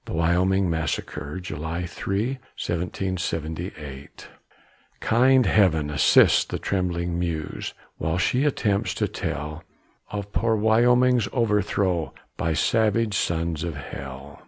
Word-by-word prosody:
THE - - -6
WYOMING 90 +3 +2
MASSACRE 80 -1 -3
[July 85 0 -4
3, 95 +7 -2 0.3
1778] 85 -5 -4 0.7
Kind 130 +2 +4
Heaven, 80 -9 +3
assist 75 - +5
the - - -2
trembling 85 -2 -1
muse, 85 -3 -3 0.2
While 80 +2 -1
she 125 +8 +2
attempts 105 -9 0
to - - 0
tell 75 +3 -4 0.5
Of 100 -1 -5
poor 115 -1 +2
Wyoming's 120 +2 +4
overthrow 100 - 0 0.2
By 80 0 -1
savage 110 +3 +2
sons 85 -3 -1
of 85 -3 -3
hell. 70 0 -8
90 Hz, 110 wpm, -24 LUFS, 80-105 Hz, 0.7 s, assist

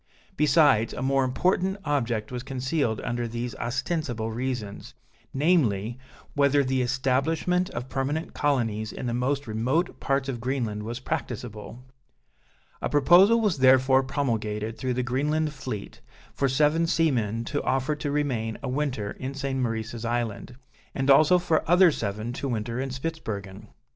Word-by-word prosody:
Besides, 145 -7 +4
a 125 - -4
more 135 0 +2
important 185 +8 +1
object 120 -7 -1
was 125 -1 -4
concealed 130 -2 -1
under 120 0 -2
these 120 +1 -4
ostensible 120 -2 -2
reasons, 115 -4 -4 0.4
namely, 130 - +1 0.3
whether 140 0 +3
the 130 0 0
establishment 135 +8 0
of 120 -5 -5
permanent 140 +5 -2
colonies 115 -7 0
in - - -6
the 120 - -1
most 135 +4 -1
remote 125 +10 -1
parts 135 -1 0
of 125 -4 -4
Greenland 120 -5 -2
was 115 +3 -5
practicable. 120 -4 -5 1.0
A - - -1
proposal 180 +10 +6
was 205 -10 +1
therefore 130 0 +5
promulgated 115 -5 -2
through 130 -2 -2
the 125 - 0
Greenland 150 +5 0
fleet, 130 -7 -7 0.3
for 135 - 0
seven 150 +5 +2
seamen 115 - +1
to 145 +4 -2
offer 135 +3 0
to 145 - -3
remain 130 -7 -1
a 135 - -2
winter 125 -7 -2
in 135 +1 -5
St. 135 -1 -2
Maurice's 115 -1 -3
Island, 120 0 -3 0.4
and 135 0 +2
also 155 +6 +6
for 170 -3 +1
other 180 0 +6
seven 110 -1 -3
to 140 - -4
winter 115 +1 -2
in 135 - -3
Spitzbergen. 110 -9 -5
130 Hz, 145 wpm, -26 LUFS, 115-145 Hz, 1.0 s, proposal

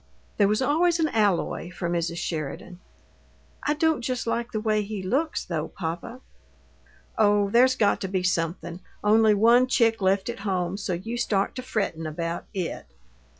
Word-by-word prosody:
There 200 - +4
was 215 +5 +1
always 335 +5 +2
an 315 -1 +2
alloy 205 -6 0
for 180 0 -4
Mrs. 170 0 -1
Sheridan. 165 +2 -5 0.8
"I 295 - 0
don't 320 -3 +1
just 250 0 -2
like 235 +1 -2
the 215 - -2
way 215 -1 +1
he 205 -1 -5
looks, 280 - -1
though, 160 -3 -3
papa." 175 +8 -6 1.0
"Oh, 205 -2 +3
there's 255 +3 +5
got 205 -5 +2
to 190 - -2
be 185 -1 -1
something! 170 -1 -2 0.2
Only 215 0 +5
one 235 +4 +5
chick 230 -4 +2
left 190 +1 +2
at 235 -2 -4
home, 185 -3 -1
so 200 -2 -3
you 225 +8 -4
start 205 -4 0
to - - -3
frettin' 195 -10 -2
about 165 +2 -4
IT!" 180 - -4
205 Hz, 165 wpm, -25 LUFS, 180-235 Hz, 1.0 s, there's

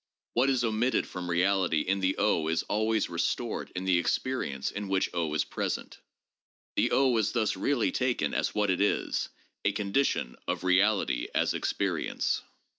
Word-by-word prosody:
"What 125 +3 +3
is 130 -3 +2
omitted 115 +3 +1
from 90 -1 -6
reality 90 -2 +2
in 100 +4 0
the 95 0 +1 0.3
is 80 - +1
always 110 0 0
restored 85 +7 -2
in 90 +1 -3
the 90 -2 +3
experience 85 - -1
in 100 0 -5
which 95 -1 0
is 80 -3 0
present. - - -4 0.8
The - - +3
is 125 -6 +3
thus 110 -4 +1
really 120 +5 +1
taken 125 -1 0
as - - -1
what 105 -2 +2
it 90 - 0
is— 105 - 0 0.3
a 100 - +2
condition 100 - 0
of - - -2
reality 95 - +2
as - - +2
experience. - - -1
100 Hz, 150 wpm, -29 LUFS, 90-115 Hz, 0.8 s, What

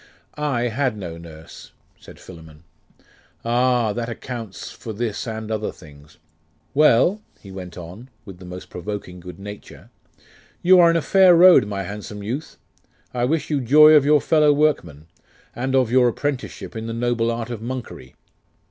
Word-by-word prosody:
'I 145 -5 -2
had 125 -1 -1
no 85 -4 -7
nurse,' 80 0 -13 0.3
said - - -15
Philammon. 80 -3 -14 0.8
'Ah! 120 -2 +1
that 120 +1 -4
accounts 115 -3 -7
for 110 - -8
this 110 +1 -4
and 110 -1 -5
other 110 -1 -2
things. 75 -3 -17 0.6
Well,' 150 - +3 0.2
he 100 - -13
went 90 -2 -9
on, 90 +9 -10 0.2
with 95 -4 -11
the 90 - -12
most 90 +1 -10
provoking 90 -1 -7
good 90 -1 -11
nature, 105 +1 -11 0.7
'you 185 +1 +6
are 170 -1 +7
in 165 - +2
a 165 - -2
fair 190 -2 +5
road, 175 - +7
my 100 -1 -4
handsome 105 0 -8
youth; 130 +9 -6 0.6
I 120 -1 0
wish 155 +4 -1
you 145 -2 0
joy 150 +5 +7
of 150 -3 +6
your 150 0 +4
fellow 150 -2 +3
workmen, 140 - 0 0.5
and 130 +2 -2
of 130 -3 +2
your 125 -1 +4
apprenticeship 135 0 -4
in 110 0 -5
the 115 - -4
noble 115 0 -1
art 115 0 -4
of 115 -3 -6
monkery. 120 - -7
115 Hz, 165 wpm, -21 LUFS, 95-135 Hz, 0.8 s, are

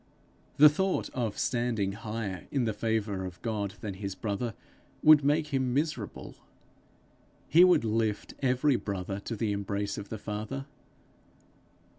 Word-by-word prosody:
The 150 - +10
thought 190 +6 +1
of 115 -5 -3
standing 120 -5 0
higher 105 -3 -5
in 135 -3 0
the 110 - 0
favour 105 -3 -1
of 90 -1 -7
God 105 -4 -2
than 105 -2 -4
his 100 0 -5
brother, 110 +3 -3 0.5
would 155 -2 +8
make 150 +2 +2
him 130 -2 +1
miserable. 145 -8 -3 1.1
He 170 +4 +7
would 180 -10 +5
lift 110 -1 -1
every 130 +1 +3
brother 100 -1 -4
to 115 +3 -5
the 110 0 -1
embrace 100 0 -2
of 100 - -8
the 110 - -4
Father. 110 +7 -5
110 Hz, 140 wpm, -29 LUFS, 100-130 Hz, 1.1 s, The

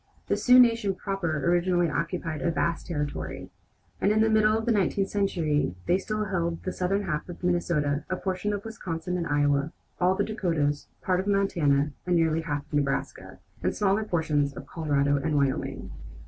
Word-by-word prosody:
The - - +3
Sioux 250 0 +5
nation 230 -5 +4
proper 170 -8 -2
originally 175 0 +2
occupied 165 0 -3
a 170 - +1
vast 170 0 -1
territory, 150 -4 -4 0.5
and 200 - +3
in 215 +1 +3
the 220 0 +3
middle 215 0 +4
of 225 - -3
the 235 - +2
nineteenth 195 -1 +1
century 160 - 0
they 180 +2 +2
still 215 +2 -2
held 170 -4 -2
the 185 - -2
southern 195 +3 -1
half 170 -2 -3
of 175 - -9
Minnesota, 160 -5 0
a 185 - 0
portion 190 +2 -2
of 205 0 -4
Wisconsin 180 -6 -4
and 170 -2 -2
Iowa, 145 0 +1 0.3
all 180 +1 +3
of - - -5
the 205 - +2
Dakotas, 165 -9 -1 0.2
part 185 -1 +1
of 190 - -3
Montana, 155 -8 +2 0.2
nearly 165 -2 +2
half 145 -3 -3
of - - -22
Nebraska, 140 -2 -2 0.2
and - - -1
small 205 +1 +2
portions 150 -6 0
of - - -7
Colorado 145 -3 +1
and 150 +2 -1
Wyoming. 140 -2 -1
175 Hz, 180 wpm, -27 LUFS, 150-195 Hz, 0.5 s, Sioux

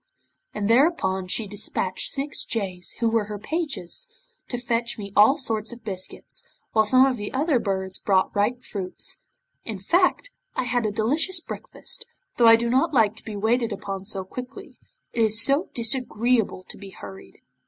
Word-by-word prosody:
'And 200 - -1
thereupon 230 - +3
she 215 +4 -2
despatched 190 -2 -1
six 280 +1 -3
jays, 185 -6 -3
who 230 - +3
were 225 -2 +2
her 210 0 -5
pages, 305 - -3 0.4
to 245 - -3
fetch 235 -1 -1
me 200 -2 -7
all 215 +7 +7
sorts 225 -5 -1
of 240 -1 -11
biscuits, 190 -3 -6 0.3
while 220 -1 +4
some 255 +4 +6
of 260 -2 +1
the 205 -1 -5
other 290 -1 +2
birds 190 -3 -2
brought 190 -2 +2
ripe 230 +5 +1
fruits. 190 -3 -6 0.4
In 220 -3 -5
fact, 355 - +2 0.2
I - - +1
had 245 -2 +1
a - - -1
delicious 290 - +1
breakfast, - - -4 0.3
though 235 - +6
I 225 - +10
do 235 +1 0
not 270 +6 +2
like 220 -3 +4
to - - -10
be 215 - -6
waited 225 +3 +1
upon 195 -1 -5
so 195 -2 -3
quickly. 250 +7 -9 0.3
It 235 - +1
is 220 0 +3
so 280 +8 +3
disagreeable 235 -3 +1
to - - -8
be 200 -1 -9
hurried. 100 - -11
225 Hz, 175 wpm, -25 LUFS, 200-255 Hz, 0.4 s, I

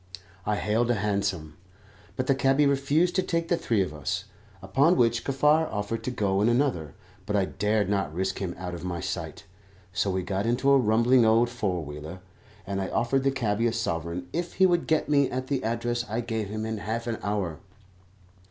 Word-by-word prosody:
I 105 - +2
hailed 110 +3 0
a 120 - +3
hansom, 100 -7 -2 0.6
but 130 - -1
the 135 - +3
cabby 135 +2 +3
refused 140 +5 +2
to - - +4
take 170 -2 -2
the 175 - +4
three 115 - +1
of 90 - -6
us, 75 -3 -3 0.4
upon 160 +7 +3
which 120 0 +2
Kaffar 150 +4 +3
offered 105 +2 -3
to - - 0
go 100 -5 0
in 110 - +4
another; 120 - 0 0.3
but 105 - -1
I 100 -2 +3
dared 105 +1 0
not 100 -5 0
risk 95 +3 -2
him 90 -3 -3
out 90 -1 -5
of 85 -1 -7
my 90 -1 -3
sight, - - -5 0.5
so 95 - 0
we 95 -1 -1
got 100 +4 -2
into 125 +4 +2
a 140 - +7
rumbling 120 +2 +4
old 115 +2 +4
four 95 -9 -2
wheeler, 75 +5 -8 0.4
and 100 0 -2
I 95 - -2
offered 125 +6 +1
the 135 - +2
cabby 115 -4 0
a 115 - 0
sovereign 85 -5 -3
if 170 +1 -3
he 190 - +4
would 175 -2 +2
get 160 -1 +1
me 140 -2 +3
at 130 +1 -4
the 140 -2 -1
address 120 +1 -1
I 110 +3 -1
gave 110 -3 -3
him 110 +1 -3
in 110 -1 -3
half 115 +3 -3
an 115 -2 -3
hour. 100 -7 -2
110 Hz, 205 wpm, -27 LUFS, 95-130 Hz, 0.6 s, a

